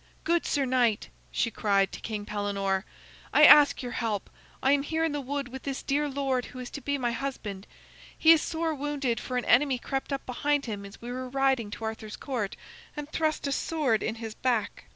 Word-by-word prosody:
"Good 340 +1 +1
sir 280 -2 +1
knight," 245 -4 +1 0.2
she 230 - 0
cried 200 -2 +2
to - - -7
King 210 -2 -5
Pellenore, 200 -2 -1 0.5
"I - - +5
ask 290 -2 +8
your 245 - -4
help. 220 -5 -2 0.3
I 270 - +4
am 285 0 +4
here 320 +3 -1
in 325 - +1
the 290 0 -2
wood 275 0 -3
with 265 +1 -7
the 275 -1 -3
dear 290 +2 +1
lord 270 -2 -1
who 255 - -11
is 250 -1 -7
to 285 - -6
be 285 +2 -1
my 245 -3 0
husband. 230 -6 -5 0.5
He 320 - +7
is 325 -2 +7
sore 325 -1 -1
wounded, 285 -4 -1
for 250 - -3
an 250 - -1
enemy 265 +1 +4
crept 270 +3 -4
up 275 - -3
behind 285 +3 0
him 205 -4 -5
as 200 +3 -14
we 240 - -5
were 255 0 -4
riding 265 -4 +1
to 225 - -8
Arthur's 220 -1 -5
Court, 235 -8 -3 0.4
and 295 0 -6
thrust 315 -1 0
a 280 - -1
sword 275 -7 +1
in - - -2
his 225 -1 -6
back." 230 -4 -1
255 Hz, 215 wpm, -28 LUFS, 220-285 Hz, 0.5 s, ask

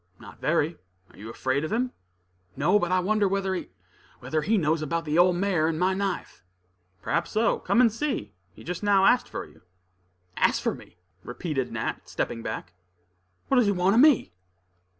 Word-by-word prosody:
"Not - - -14
very. 165 +1 +1 0.3
Are - - -20
you 110 +2 -8
afraid 130 +4 -1
of 155 - -4
him?" 245 +3 0 0.7
"No; 180 +9 +3
but 175 -1 -1
I 185 - +3
wonder 210 +2 +2
whether 195 0 -1
he 185 - -5 0.5
whether 155 0 -2
he 215 +8 +1
knows 160 -2 +1
anything 155 - -4
about 170 0 -1
the 155 +2 +1
old 180 0 +5
mare 180 -4 +1
and 160 -1 -1
my 185 +1 +2
knife." 195 - -4 0.6
"Perhaps 170 0 -1
so; 225 +2 +1
come - - +1
and 230 -4 +4
see. 230 - -3 0.2
He - - -15
just 175 0 -5
now 200 -2 +4
asked 250 - +3
for - - -5
you." 75 +1 -20 0.8
"Asked - - +2
for - - +1
me?" - - -14 0.3
repeated 135 +1 -3
Nat, - - -4
stepping 115 - -3
back. 95 -4 -6 0.7
"What 270 - +2
does 245 -4 +4
he - - +3
want 185 +1 +2
of 235 - +5
me?" 280 - +4
180 Hz, 190 wpm, -26 LUFS, 155-205 Hz, 0.8 s, old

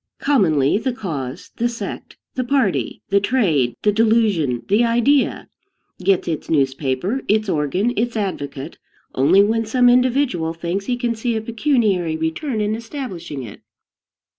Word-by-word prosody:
Commonly, 180 - +2
the 255 +2 -2
cause, 145 - -6
the 240 +1 +1
sect, 235 - -7 0.2
the 255 - -1
party, 250 -7 0
the 200 0 +4
trade, 185 - +1
the 210 - +4
delusion, 210 - +2
the 210 +4 +3
idea, 240 +4 +2 0.5
gets 190 0 +1
its 160 -3 -3
newspaper, 140 - 0
its 215 +1 +2
organ, 180 - 0
its 230 +1 -1
advocate, 145 -7 -4 0.3
only 165 +10 +5
when 225 +2 +1
some 245 +3 +3
individual 245 - +2
thinks 175 +4 -3
he 245 - 0
can 240 -1 -1
see 230 +1 -2
a - - 0
pecuniary 220 - 0
return 215 - -2
in 210 +1 0
establishing 220 - -6
it. 110 - -10
205 Hz, 140 wpm, -20 LUFS, 160-240 Hz, 0.5 s, only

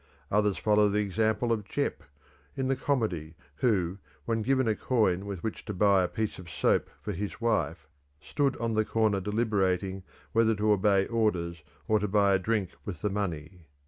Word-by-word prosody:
Others 105 -1 +2
follow 105 -1 +3
the 105 +1 +1
example 110 +3 0
of 110 -2 0
Jeppe, 100 - -2 0.5
in 130 -1 -1
the 135 - +2
comedy, 110 - -1 0.2
who, 95 -6 +1 0.3
when 115 -1 0
given 130 +2 +2
a 110 - +3
coin 100 -7 +1
with 95 -4 -6
which 110 - -4
to 105 - -5
buy 100 0 +4
a 90 - +1
piece 110 +1 -3
of 90 -2 -10
soap - - +1
for - - -3
his 100 +3 -5
wife, 110 -9 0 0.3
stood 140 - -1
on 115 -1 -1
the 110 0 +2
corner 110 -2 +1
deliberating 95 -3 0 0.3
whether 110 0 +3
to 105 +1 +1
obey 100 -1 +3
orders 90 -8 -1 0.3
or 110 0 +3
to 105 - -1
buy 100 0 +3
a 95 - +3
drink 100 -2 -1
with 100 0 -7
the 105 - +1
money. 90 -4 -4
105 Hz, 180 wpm, -29 LUFS, 95-110 Hz, 0.5 s, buy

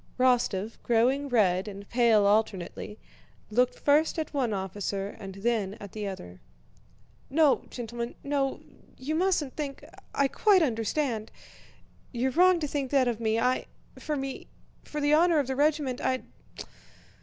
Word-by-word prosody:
Rostóv, 235 -5 +1
growing 255 +5 +2
red 195 -5 +2
and 200 -1 -8
pale 235 -4 +4
alternately, 205 -1 0 0.5
looked 250 +3 +2
first 300 +4 +2
at 315 -1 -3
one 260 -5 0
officer 195 0 -3
and 195 -1 -8
then 205 -1 -1
at 200 -2 -9
the 210 -2 -4
other. 90 - -8 0.9
"No, 300 0 +3
gentlemen, 235 0 -5
no... 280 -1 -1 0.4
you 280 +4 -3
mustn't 330 -5 +1
think... 285 -3 -5 0.3
I 280 0 +3
quite 385 +4 +4
understand. 225 -2 -1 0.8
You're 255 +1 0
wrong 360 +4 +5
to 300 - -1
think 275 -2 -2
that 270 -2 +3
of 235 -2 -1
me... 220 -1 +1
I... 250 +2 +1 0.3
for 305 - -3
me... 270 -1 -5 0.4
for 300 - -5
the 290 0 +2
honor 335 +1 +5
of 290 - +2
the 265 +1 -3
regiment 290 -3 +1
I'd... 255 0 0
250 Hz, 145 wpm, -28 LUFS, 215-290 Hz, 0.9 s, wrong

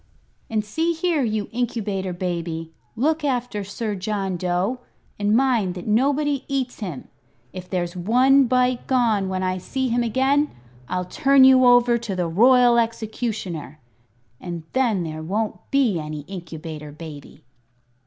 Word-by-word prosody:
And 215 -1 -1
see 325 +11 0
here, 330 -2 0
you 215 -4 -1
Incubator 215 -6 -2
Baby, 170 -2 -4 0.2
look 310 +6 0
after 245 -6 -1
Sir 210 +2 -4
John 195 -1 -2
Dough, 180 +7 -1 0.4
and 205 +2 +3
mind 235 -9 +1
that 180 - -7
nobody 280 +5 +1
eats 265 -3 -2
him. 180 - -6 0.5
If 185 -1 -8
there's 175 -1 -2
one 255 +9 +4
bite 250 0 +1
gone 225 -7 +2
when 185 0 -2
I 185 0 -1
see 260 +7 -2
him 240 +1 +1
again 265 +5 +2 0.4
I'll 180 0 -2
turn 275 +5 +4
you 260 -1 +7
over 245 -1 +5
to 225 -5 -4
the 180 -2 -1
Royal 240 +6 +5
Executioner 220 - -3 0.6
and 170 -2 -6
then 235 -8 +1
there 155 -1 -5
won't 210 +7 -2
be 250 -10 +2
any 150 -1 -5
Incubator 160 -3 -8
Baby." 150 -2 -11
215 Hz, 145 wpm, -23 LUFS, 180-255 Hz, 0.6 s, you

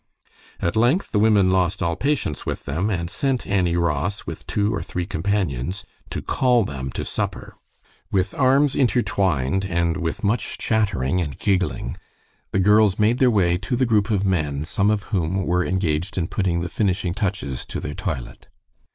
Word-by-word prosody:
At 85 - -1
length 125 - +2
the 105 - +2
women 105 -3 +4
lost 95 0 +1
all 85 -1 0
patience 140 - -1
with - - -4
them, 85 +9 -1
and 85 -5 -1
sent 130 +7 -1
Annie 90 -3 +1
Ross, 85 +3 -1
with - - -7
two 105 +1 0
or 100 - -2
three 90 -1 -4
companions, 95 - -2 0.2
to - - -5
call 125 -3 +2
them 65 -4 -5
to - - -3
supper. - - -4 0.6
With 95 -2 +1
arms 135 +1 +3
intertwined, 95 - +1
and 85 -2 0
with 85 +2 -3
much 105 +3 0
chattering 95 - 0
and 75 -5 -4
giggling, 95 - -1 0.5
the - - -1
girls 105 +1 +4
made 110 +3 +2
their 130 - +5
way 90 -6 +2
to 125 +6 -2
the 130 +1 +2
group 110 -2 +2
of 100 -3 +1
men, 75 -6 0
some 100 +4 +1
of 105 -1 +1
whom 95 +1 0
were 90 +1 +1
engaged 90 -3 -1
in 85 - +1
putting 90 -4 0
the 85 - -2
finishing 95 -3 0
touches 95 - -2
to - - -4
their 75 - -5
toilet. 60 -4 -5
95 Hz, 175 wpm, -22 LUFS, 85-105 Hz, 0.6 s, their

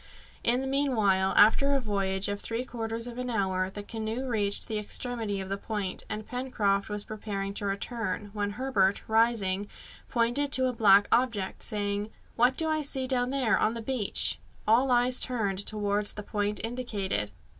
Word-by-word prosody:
In 245 +2 +2
the 265 - -3
meanwhile, 220 -9 +2
after 275 +7 +5
a - - +2
voyage 195 -4 -1
of 205 0 -3
three 230 +2 -3
quarters 230 -1 -4
of 245 0 -6
an 250 0 -3
hour, 190 -4 0
the 205 +1 -8
canoe 225 +4 -4
reached 205 -4 -1
the 220 -2 -2
extremity 220 -1 -3
of 190 - -5
the 195 +1 -3
point, 205 -4 -4
and 215 0 -4
Pencroft 220 -6 -1
was 210 0 -3
preparing 205 -2 -5
to 200 0 -3
return, 205 0 -3
when 205 -1 -2
Herbert, 205 -5 +1
rising, 220 -3 +2 0.4
pointed 245 +4 +1
to 260 - +6
a 255 - 0
black 205 -3 +5
object, 230 -6 +1
saying, 205 0 -2 0.3
"What 245 +3 +3
do 320 - 0
I 310 0 +1
see 270 -2 -1
down 250 -1 +1
there 260 -4 +2
on 220 +2 +1
the - - -4
beach?" 230 -3 +2 0.3
All 240 +5 +4
eyes 245 0 +3
turned 210 -7 +1
towards 205 -1 0
the 210 - -7
point 205 0 -2
indicated. 210 - -2
220 Hz, 175 wpm, -28 LUFS, 200-245 Hz, 0.4 s, to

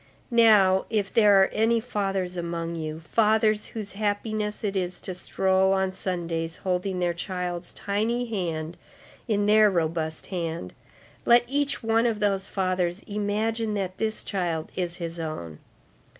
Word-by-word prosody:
Now, 210 -5 +5
if 205 -3 -1
there 205 -3 +6
are - - +1
any 225 +1 +2
fathers 195 -6 -2
among 170 -1 -3
you, 155 -1 -4
fathers 215 +4 +2
whose 215 -3 -6
happiness 210 +1 -2
it 200 -2 -1
is 180 -1 -2
to 185 - -5
stroll 190 +1 +1
on 190 -1 +1
Sundays 170 -3 -3
holding 185 0 -1
their 175 -1 0
child's 180 0 -4
tiny 225 +5 -1
hand 170 -7 -3 0.5
in 205 -3 +1
their 215 0 +6
robust 160 -3 -1
hand, 165 - -3 0.5
let 240 0 +6
each 280 +2 -1
one 225 +1 +3
of 220 -3 -1
those 195 -2 0
fathers 185 -1 -1
imagine 215 +2 -1
that 190 -2 -3
this 220 0 -1
child 170 -5 -2
is 175 -2 -2
his 170 -1 -6
own. 85 - -5
190 Hz, 145 wpm, -26 LUFS, 175-215 Hz, 0.5 s, there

